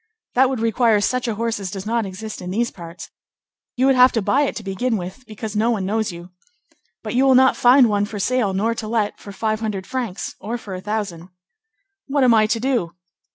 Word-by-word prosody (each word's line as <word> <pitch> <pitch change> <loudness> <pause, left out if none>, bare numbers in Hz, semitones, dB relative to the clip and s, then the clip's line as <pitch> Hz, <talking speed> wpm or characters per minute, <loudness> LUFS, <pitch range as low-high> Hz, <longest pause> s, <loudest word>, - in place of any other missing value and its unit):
"That 260 +1 +4
would 260 -3 -2
require 225 -1 +3
such 250 +4 0
a 225 - -1
horse 230 0 -2
as 195 -2 -4
does 195 0 -6
not 230 -1 0
exist 215 +3 -7
in 180 - -6
these 235 +5 -1
parts. 170 -1 -10 0.6
You 255 - +2
would 270 - +5
have 255 0 +6
to 225 - +1
buy 275 - +2
it - - -3
to 225 - -6
begin 215 +5 -1
with, 185 +6 -7
because 215 0 -6
no 220 +3 +2
one 210 -5 0
knows 215 +1 -1
you. 175 +1 -11 0.7
But - - -4
you 255 +2 +3
will 265 -1 +5
not 260 0 +5
find 250 +1 +6
one 205 -1 +1
for 210 0 -7
sale 230 0 +1
nor 210 +5 0
to 225 -1 -6
let, 215 -2 -1
for 200 - -10
five 215 +2 -2
hundred 210 -4 -3
francs, 240 -7 -4
or 220 +5 -4
for 205 -4 -9
a 185 - -5
thousand." 200 -4 -4 0.8
"What 280 -1 +1
am 245 -2 +5
I 215 -1 +4
to 225 +1 0
do?" 235 -9 -1
220 Hz, 230 wpm, -21 LUFS, 195-245 Hz, 0.8 s, have